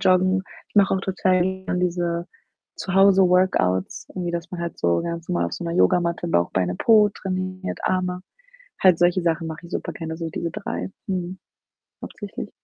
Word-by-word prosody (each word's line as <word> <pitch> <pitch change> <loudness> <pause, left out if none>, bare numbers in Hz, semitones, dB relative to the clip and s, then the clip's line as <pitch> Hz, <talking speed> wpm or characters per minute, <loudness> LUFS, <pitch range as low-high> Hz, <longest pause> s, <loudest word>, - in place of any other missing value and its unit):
Joggen. 185 0 +3 0.3
Ich - - -33
mache 195 -1 +5
auch 190 - -1
total 185 -1 +1
gerne 190 -1 -2
diese 175 -1 -1 0.5
Zu-Hause-Workouts, 185 - +3
irgendwie, 175 -2 -3
dass 170 0 -4
man 180 - -5
halt 170 - -5
so 85 0 +2
ganz 170 0 -5
normal 85 0 +1
auf 85 - -7
so - - -5
'ner 170 - -2
Yogamatte 170 - +2
Bauch, 85 - +2
Beine, 90 -1 0
Po 215 -2 +5
trainiert, 185 -1 -4
Arme. 180 -1 0 0.6
Halt 180 -3 +5
solche 175 +1 +3
Sachen 165 0 0
mache 160 +2 -7
ich - - -13
super - - -3
gerne, 160 -1 -5
so 165 -1 -4
diese 170 +1 -3
3, 205 0 -4 0.2
mhm, 185 -1 -3 0.6
hauptsächlich. 205 -1 -7
180 Hz, 170 wpm, -23 LUFS, 170-185 Hz, 0.6 s, mache